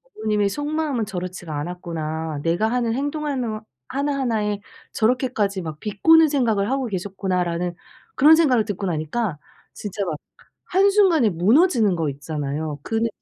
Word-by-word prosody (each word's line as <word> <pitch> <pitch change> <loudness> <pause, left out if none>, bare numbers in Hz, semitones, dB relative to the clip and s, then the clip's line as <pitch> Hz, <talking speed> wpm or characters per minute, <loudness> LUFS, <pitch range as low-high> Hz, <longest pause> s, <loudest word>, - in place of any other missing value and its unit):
'어머님의 210 -1 +1
속마음은 290 -1 -2
저렇지가 180 -4 -5
않았구나. 160 -2 -4
내가 175 +7 +1
하는 240 -2 0
행동 290 +3 -2
하너 245 -7 -2 0.3
하나하나에 245 -8 -1 0.3
저렇게까지 220 -4 0
막 160 -3 -6
비꼬는 315 +10 +5
생각을 230 -7 +1
하고 270 -1 0
계셨구나.'라는 180 -3 -2 0.4
그런 305 +4 +7
생각을 265 -9 +3
듣고 205 -2 -4
나니까 165 +3 -2 0.4
진짜 205 -1 -4
막 165 -4 -2 0.5
한순간에 380 - +4
무너지는 215 - +3
거 160 -3 -1
있잖아요. 145 +1 -4
그 225 - -5
느낌이 230 +1 +1
210 Hz, 360 characters per minute, -22 LUFS, 175-265 Hz, 0.5 s, 그런